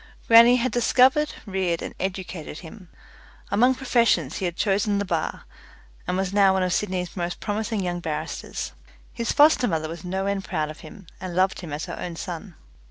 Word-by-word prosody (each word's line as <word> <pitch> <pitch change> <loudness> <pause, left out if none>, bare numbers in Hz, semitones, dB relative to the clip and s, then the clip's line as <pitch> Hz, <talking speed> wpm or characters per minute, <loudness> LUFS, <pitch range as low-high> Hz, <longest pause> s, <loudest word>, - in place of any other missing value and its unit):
Grannie 235 +2 +8
had 250 +1 0
discovered, 260 +5 +3
reared, 190 -4 -1
and - - -6
educated 180 -4 -5
him. 185 +1 -12 0.6
Among 245 +6 +4
professions 230 - +1
he 190 - -2
had 175 -1 -2
chosen 205 +1 +1
the 200 - -1
bar, 165 -4 -2 0.6
and 180 - 0
was 190 0 -1
now 200 -2 +5
one 190 -1 +1
of 180 -1 0
Sydney's 185 -4 -2
most 175 -1 -3
promising 215 0 -2
young 175 -1 -2
barristers. 155 -3 -4 0.4
His 235 -1 -2
foster 295 -4 +5
mother 160 -3 -1
was 165 0 -8
no 190 +2 -2
end 200 -1 -1
proud 155 -6 -2
of 155 - -13
him, 175 +5 -12
and 185 -2 -6
loved 190 +1 +2
him 170 -4 -8
as 150 +3 -4
her 175 - -7
own 175 -1 -5
son. 175 +2 -7
190 Hz, 185 wpm, -24 LUFS, 175-215 Hz, 0.6 s, Grannie